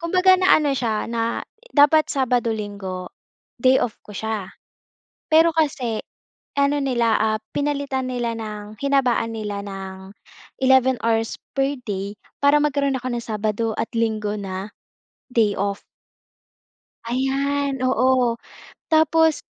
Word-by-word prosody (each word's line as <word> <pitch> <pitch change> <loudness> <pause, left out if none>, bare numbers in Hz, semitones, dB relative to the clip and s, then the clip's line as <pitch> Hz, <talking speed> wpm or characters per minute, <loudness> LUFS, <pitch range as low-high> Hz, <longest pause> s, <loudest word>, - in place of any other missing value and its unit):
Kumbaga 365 +2 +4
na-ano 305 -6 +4
siya 225 -3 -1
na 230 0 -1 0.3
dapat 300 +2 +5
Sabado, 245 -4 +1
Linggod, 200 -4 -5 0.6
ay 260 +1 +6
off 225 - -2
ko 210 - -11
siya. 220 -4 -4 0.8
Pero 325 +1 +7
kasi 255 -8 0 0.6
ano 280 +1 +2
nila, 235 -4 +2
ah, 215 0 +2 0.2
pinalitan 280 -2 -1
nila 240 -2 -1
ng, 210 -1 -7
hinabaan 255 -5 +1
nila 210 -2 -4
ng, 190 0 -8 0.5
11 260 0 +5
hours 225 -1 +1 0.2
per 275 +1 +1
day 200 +1 -3 0.3
para 285 +1 +6
magkaroon 280 -2 +1
ako 255 - -5
ng 235 -1 -3
Sabado 215 +1 -1
at - - -2
Linggo 215 -2 0
na, 195 +1 -5 0.6
day 215 -4 +2
off. 200 0 -2 1.2
Ayan, 275 +2 0
oo. 255 -1 +3 0.5
Tapos 320 0 +3
240 Hz, 120 wpm, -22 LUFS, 215-280 Hz, 1.2 s, Pero